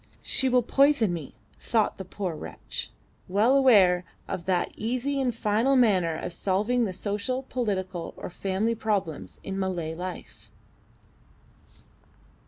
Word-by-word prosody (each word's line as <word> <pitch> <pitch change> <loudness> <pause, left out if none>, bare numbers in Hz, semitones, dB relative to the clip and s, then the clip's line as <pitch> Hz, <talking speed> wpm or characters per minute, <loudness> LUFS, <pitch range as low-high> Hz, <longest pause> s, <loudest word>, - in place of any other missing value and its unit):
She 265 - +2
will 250 -1 +3
poison 275 -6 +3
me, 160 -5 -6 0.2
thought 220 -4 0
the 190 - -5
poor 185 -2 -4
wretch, - - -6 0.4
well 215 +8 +3
aware 200 -10 +5 0.2
of 170 - -4
that 185 -2 +1
easy 255 +5 -1
and 255 -2 +1
final 230 +4 +1
manner 190 -10 +3
of 175 - -5
solving 215 +7 +1
the 195 - -2
social, 210 +7 -2
political, 190 -9 -3
or - - -7
family 195 +5 -1
problems 205 -8 -2
in 195 0 -4
Malay 175 -4 -2
life. 180 +1 -8
205 Hz, 130 wpm, -27 LUFS, 185-245 Hz, 0.4 s, aware